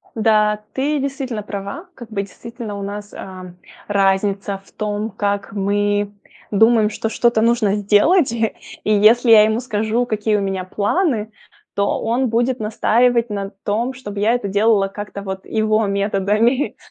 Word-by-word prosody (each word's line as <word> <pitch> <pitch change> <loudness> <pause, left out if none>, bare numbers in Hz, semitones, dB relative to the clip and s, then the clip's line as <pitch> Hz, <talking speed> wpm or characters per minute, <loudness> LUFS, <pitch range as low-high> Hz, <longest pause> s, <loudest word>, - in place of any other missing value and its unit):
Да, 215 -1 +2
ты 285 +2 0
действительно 270 -5 -3
права. 200 - -6
Как 240 -3 -11
бы 210 -3 -2
действительно 225 +2 -8
у - - -6
нас, 205 +1 -7
а, 185 -2 -9 0.3
разница 195 0 0
в - - -22
том, 210 0 -3
как 200 -1 -2
мы 205 0 0 0.4
думаем, 220 +1 +4
что 220 - -3
что-то 235 0 +2
нужно 230 -3 +2
сделать. 220 - +3
И 225 -2 0 0.4
если 230 +4 +5
я 215 -1 +9
ему 220 +2 +1
скажу, 225 0 -1
какие 215 -2 0
у 205 - +1
меня 195 -2 -2
планы, 215 - 0 0.4
то 200 0 0
он 240 +3 0
будет 240 +3 0
настаивать 235 +2 +2
на 200 -1 -4
том, 230 +5 -1
чтобы 210 -6 -7
я 215 +3 +3
это 245 -5 -2
делала 205 -1 +2
как-то 205 0 -7
вот 190 -1 -6
его 215 0 +1
методами. 205 +6 +1
210 Hz, 155 wpm, -19 LUFS, 200-235 Hz, 0.4 s, я